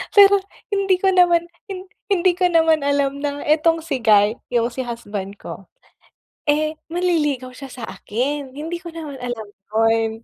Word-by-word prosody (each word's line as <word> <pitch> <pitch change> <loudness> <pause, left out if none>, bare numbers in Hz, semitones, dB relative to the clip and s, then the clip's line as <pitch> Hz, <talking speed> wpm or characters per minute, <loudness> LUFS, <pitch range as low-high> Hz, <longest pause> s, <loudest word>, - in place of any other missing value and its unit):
Pero 400 -1 +9 0.4
hindi 390 -2 +2
ko 385 - +1
naman 350 -2 +4 0.2
hin 375 -1 -6 0.3
hindi 370 -1 +4
ko 360 0 +2
naman 325 -2 +4
alam 280 0 0
na 285 0 -3
etong 320 +2 +3
si 275 -6 -2
guy, 210 -1 +5
yung 235 -1 +2
si 260 - -3
husband 205 -5 -6
ko, 195 - -9 0.8
eh, 305 +1 +1 0.2
manliligaw 310 -7 0
siya 275 -2 -9
sa 245 - -7
akin, 265 +5 -3
hindi 310 +5 -5
ko 340 -2 -8
naman 310 -4 -7
alam 245 -3 -4 0.3
yun. 225 0 +3
290 Hz, 160 wpm, -21 LUFS, 240-340 Hz, 0.8 s, Pero